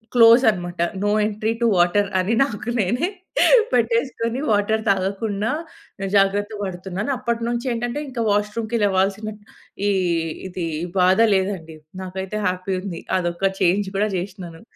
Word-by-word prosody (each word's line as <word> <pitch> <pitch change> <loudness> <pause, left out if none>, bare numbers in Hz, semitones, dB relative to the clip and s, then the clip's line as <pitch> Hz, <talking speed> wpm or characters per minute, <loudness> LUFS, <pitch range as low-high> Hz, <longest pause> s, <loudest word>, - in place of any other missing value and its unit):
Close 235 +2 +7
అన్నమాట. 175 -3 -4 0.2
No 205 - +2 0.2
entry 215 +1 -1
to - - +3
water 180 +4 +3
అని 185 +5 0
నాకు 240 -2 -4
నేనే 240 - +1 0.7
పెట్టేసుకొని, 230 0 0
వాటర్ 215 +1 +2
తాగకుండా 200 +2 0 0.6
జాగ్రత్త 200 +1 +2
పడుతున్నాను. 190 +3 -4
అప్పటినుంచి 235 0 -2
ఏంటంటే, 240 +4 -3
ఇంకా 240 -3 -2
వాష్‌రూమ్‌కి 220 +3 -1
లేవాల్సిన 200 +2 +1 0.6
ఈ - - +3 0.6
ఇది, 180 -1 -4 0.2
ఈ - - -1
బాధ 185 +3 +4 0.2
లేదండి. 185 -5 -2 0.3
నాకైతే 190 +3 -5
హ్యాపీ 185 +1 -2
ఉంది. 185 -4 -6 0.2
అదొక 175 +2 0
చేంజ్ 190 +3 +2
కూడా 210 +1 +1
చేసినాను. 180 -3 -7
205 Hz, 125 wpm, -22 LUFS, 185-230 Hz, 0.7 s, Close